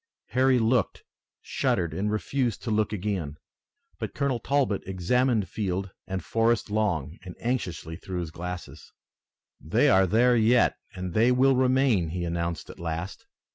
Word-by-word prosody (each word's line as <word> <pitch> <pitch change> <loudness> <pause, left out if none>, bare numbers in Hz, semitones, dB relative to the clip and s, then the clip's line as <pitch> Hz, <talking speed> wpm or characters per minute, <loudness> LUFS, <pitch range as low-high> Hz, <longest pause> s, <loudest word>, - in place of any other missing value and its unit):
Harry 130 0 +3
looked, 120 +1 +1 0.4
shuddered 85 -3 0
and 100 +5 -1
refused 120 +2 -1
to 115 - -2
look 105 0 +1
again. 95 -8 -3 0.6
But - - -5
Colonel 140 -4 0
Talbot 135 -5 0
examined 105 +4 +1
field 95 -2 -3 0.2
and 95 0 -4
forest 115 -2 +1
long 90 -7 -1
and 90 -2 -9
anxiously 90 -9 -3
through 90 -2 -5
his 80 -3 -6
glasses. 90 +1 -8 0.7
"They - - +2
are 95 0 +5
there 120 +6 +4
yet, 115 +2 +4 0.2
and 90 -1 -5
they 115 +5 +4
will 130 +2 +4
remain," 130 -8 +2
he 90 +2 -3
announced 85 0 -3
at - - -15
last. 85 +2 -5
105 Hz, 145 wpm, -27 LUFS, 90-125 Hz, 0.7 s, are